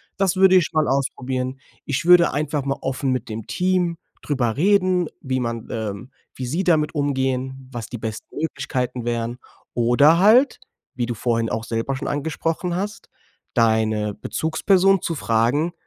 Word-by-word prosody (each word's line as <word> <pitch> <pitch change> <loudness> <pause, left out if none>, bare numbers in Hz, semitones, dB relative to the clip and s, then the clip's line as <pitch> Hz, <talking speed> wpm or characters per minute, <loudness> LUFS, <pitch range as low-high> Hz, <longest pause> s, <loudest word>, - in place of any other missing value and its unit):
Das 195 -2 +1
würde 190 0 +6
ich 180 -3 +3
mal 155 -2 +1
ausprobieren. 130 0 -2 0.2
Ich 140 +2 -2
würde 175 -1 +6
einfach 145 0 -1
mal 135 0 -2
offen 135 0 -1
mit 130 -1 -2
dem 110 -1 -6
Team 180 -2 0 0.2
drüber 125 -6 -1
reden, 185 0 +3
wie 130 -1 -1
man 115 -2 -4
ähm, 110 +2 -5 0.2
wie 130 - -5
sie 160 +10 -1
damit 155 -4 +2
umgehen, 130 -2 -1
was 120 -3 -6
die 120 - -5
besten 110 -1 -7
Möglichkeiten 125 -6 -3
wären. 120 0 -2 0.4
Oder 125 +7 +4
halt, 230 +8 +5 0.4
wie 125 - -1
du 120 - -2
vorhin 115 +1 0
auch 110 - -2
selber 115 +4 -2
schon 130 - -5
angesprochen 160 +4 -2
hast, 205 +3 -5 0.5
deine 110 -2 +2
Bezugsperson 185 +4 +2
zu 165 - -2
fragen, 130 +7 +1
135 Hz, 155 wpm, -22 LUFS, 120-170 Hz, 0.5 s, würde